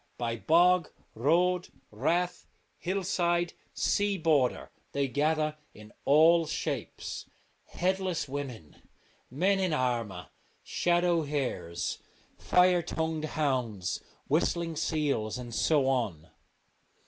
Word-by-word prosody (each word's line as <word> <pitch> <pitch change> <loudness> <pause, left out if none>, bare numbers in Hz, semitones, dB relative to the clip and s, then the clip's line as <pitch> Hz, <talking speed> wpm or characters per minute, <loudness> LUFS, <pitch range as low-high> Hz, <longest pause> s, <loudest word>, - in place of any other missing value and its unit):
By 115 -1 -2
bog, 175 +5 +4 0.2
road, 175 +8 +2 0.2
rath, 175 +11 -1 0.3
hillside, 175 -2 0 0.2
sea 205 -1 +1
border 155 -7 +1 0.2
they 140 -1 +1
gather 155 +2 0 0.2
in 105 0 -13
all 160 +3 +5
shapes: - - -4 0.4
headless 185 -2 -1
women, 130 - -7 0.5
men 185 +9 +2
in 185 -4 +1
armour, 115 -9 -1 0.3
shadow 175 -1 +2
hares, 130 - -3 0.4
fire 180 -1 +4
tongued 160 -1 -2
hounds, 120 -11 -1 0.3
whistling 165 +2 +1
seals, 145 -9 -1
and 120 -2 -7
so 145 +2 +2
on. 110 - -1
155 Hz, 95 wpm, -29 LUFS, 125-175 Hz, 0.5 s, all